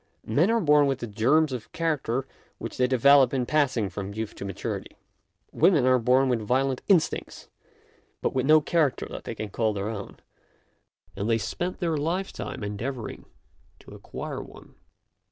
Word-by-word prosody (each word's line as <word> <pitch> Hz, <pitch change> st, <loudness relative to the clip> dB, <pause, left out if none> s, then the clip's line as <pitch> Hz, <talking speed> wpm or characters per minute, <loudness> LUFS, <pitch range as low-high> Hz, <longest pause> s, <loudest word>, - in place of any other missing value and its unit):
Men 145 Hz, -, +2 dB
are 230 Hz, 0 st, +3 dB
born 150 Hz, -6 st, +4 dB
with 135 Hz, -2 st, 0 dB
the -, -, -5 dB
germs 130 Hz, +8 st, +2 dB
of 120 Hz, -3 st, -7 dB
character 145 Hz, -6 st, -1 dB, 0.3 s
which -, -, -7 dB
they 125 Hz, -, +3 dB
develop 135 Hz, +2 st, +5 dB
in 125 Hz, -2 st, 0 dB
passing 130 Hz, -7 st, +1 dB
from 100 Hz, +2 st, -6 dB
youth 110 Hz, -1 st, -4 dB
to -, -, -8 dB
maturity. 100 Hz, -2 st, -5 dB, 0.6 s
Women 155 Hz, -9 st, +4 dB
are 130 Hz, 0 st, +4 dB
born 125 Hz, +3 st, +3 dB
with 120 Hz, -3 st, +1 dB
violent 130 Hz, +4 st, 0 dB
instincts, 185 Hz, -6 st, 0 dB, 0.7 s
but -, -, -1 dB
with 130 Hz, 0 st, 0 dB
no 155 Hz, 0 st, +7 dB
character 155 Hz, -3 st, +1 dB
that -, -, -7 dB
they -, -, -5 dB
can 110 Hz, -, -5 dB
call 110 Hz, +1 st, 0 dB
their 100 Hz, +1 st, -3 dB
own, 100 Hz, -3 st, -7 dB, 1.0 s
and 100 Hz, +3 st, -2 dB
they 115 Hz, -, +3 dB
spend 170 Hz, -, -3 dB
their 165 Hz, -3 st, -1 dB
lifetime 170 Hz, -, -3 dB
in 100 Hz, -, -3 dB
endeavouring 120 Hz, +3 st, -5 dB, 0.6 s
to -, -, -14 dB
acquire -, -, -6 dB
one. -, -, -14 dB
130 Hz, 170 wpm, -26 LUFS, 110-150 Hz, 1.0 s, no